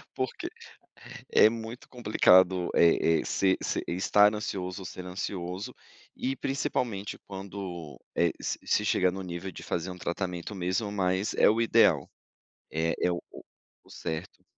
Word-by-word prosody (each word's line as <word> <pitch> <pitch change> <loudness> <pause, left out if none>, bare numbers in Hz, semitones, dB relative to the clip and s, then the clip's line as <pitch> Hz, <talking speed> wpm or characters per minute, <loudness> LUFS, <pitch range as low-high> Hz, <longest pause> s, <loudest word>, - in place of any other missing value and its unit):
porque 130 -1 -3 0.8
é 110 - +7
muito 115 +1 -7
complicado, 95 -6 +4
eh 80 -1 +4
eh, - - -8
se 95 -1 +2
se - - -1
estar 105 +4 +4
ansioso 95 -3 -4
ou - - -8
ser 90 0 -7
ansioso, 90 0 -4 0.4
e 135 +1 -2
principalmente 120 -7 -2
quando, 95 -5 -7 0.2
eh, 85 -1 +3
s - - -3
se - - +1
chega 90 0 +3
no 95 +1 -5
nível 90 +2 -5
de - - -10
fazer 85 +2 -2
um 90 - -7
tratamento 90 +2 -4
mesmo, 95 +3 -1
mas 95 0 0
é - - +5
o 110 +2 +2
ideal. 110 - +4 0.6
É 80 +1 0
é - - +2
o 85 - -3 0.6
o - - -22
certo. 80 +2 -6
95 Hz, 150 wpm, -28 LUFS, 90-105 Hz, 0.8 s, é